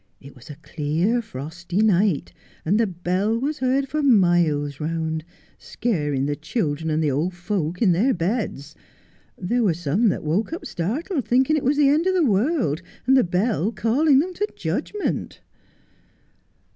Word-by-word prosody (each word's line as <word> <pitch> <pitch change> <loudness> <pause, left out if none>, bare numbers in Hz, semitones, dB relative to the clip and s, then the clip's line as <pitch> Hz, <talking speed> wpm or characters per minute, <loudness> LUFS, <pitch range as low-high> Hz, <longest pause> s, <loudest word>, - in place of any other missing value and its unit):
It 140 +1 -14
was 125 - -15
a 150 - -8
clear, 160 - -1
frosty 175 - -4
night, 195 -5 +2 0.3
and 195 +7 +2
the 230 - +2
bell 185 +4 -1
was 290 +5 -2
heard 265 +2 +1
for 305 +3 -2
miles 175 - +2
round, 160 0 -2 0.4
scaring 150 - -2
the 145 0 -1
children 155 - -2
and 155 +1 0
the 150 - +1
old 165 +7 -1
folks 180 -1 -2
in 190 - +5
their 210 +11 +2
beds. 170 - -2 0.6
There 235 +7 -1
were 190 -8 +2
some 175 +8 +1
that - - -3
woke 180 - -1
up 335 - -6
startled, 270 - -3
thinking 260 +5 +3
it 305 - -1
was 285 +3 +1
the 290 -2 +5
end 310 +5 +2
of 375 - +2
the 350 -4 +3
world, 215 - +1 0.2
and 265 +2 +4
the 260 - +5
bell 195 +3 0
calling 265 +6 +2
them 355 +7 +1
to 415 +4 -2
judgment 415 -1 -3
190 Hz, 165 wpm, -23 LUFS, 160-255 Hz, 0.6 s, in